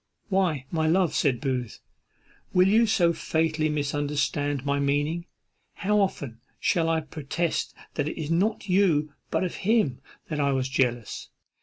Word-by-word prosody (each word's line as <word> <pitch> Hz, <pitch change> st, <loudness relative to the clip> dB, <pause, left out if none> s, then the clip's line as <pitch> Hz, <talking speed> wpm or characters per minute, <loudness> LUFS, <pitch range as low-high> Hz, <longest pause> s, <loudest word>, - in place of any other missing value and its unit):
"Why, 180 Hz, -9 st, +1 dB
my 160 Hz, -1 st, +1 dB
love," 175 Hz, +1 st, +3 dB
said 130 Hz, -5 st, +2 dB
Booth, 125 Hz, -4 st, -3 dB, 0.7 s
"will 185 Hz, 0 st, +5 dB
you 225 Hz, +3 st, +4 dB
so 175 Hz, -6 st, +3 dB
fatally 160 Hz, -1 st, 0 dB
misunderstand 145 Hz, -1 st, -1 dB
my 140 Hz, 0 st, +1 dB
meaning? 145 Hz, +5 st, 0 dB, 0.5 s
how 210 Hz, +1 st, +1 dB
often 140 Hz, -, -2 dB, 0.2 s
shall 165 Hz, -3 st, +2 dB
I 165 Hz, -1 st, +2 dB
protest 155 Hz, +2 st, -3 dB, 0.2 s
that 145 Hz, -1 st, -1 dB
it -, -, -7 dB
is 155 Hz, 0 st, -3 dB
not 200 Hz, +6 st, +1 dB
of -, -, -12 dB
you, 170 Hz, -6 st, +2 dB, 0.2 s
but -, -, 0 dB
of 180 Hz, -, -3 dB
him, 205 Hz, -, +1 dB, 0.3 s
that 150 Hz, -2 st, -3 dB
I 140 Hz, -1 st, +2 dB
was 130 Hz, 0 st, 0 dB
jealous? 120 Hz, -4 st, -1 dB
155 Hz, 155 wpm, -26 LUFS, 140-180 Hz, 0.7 s, will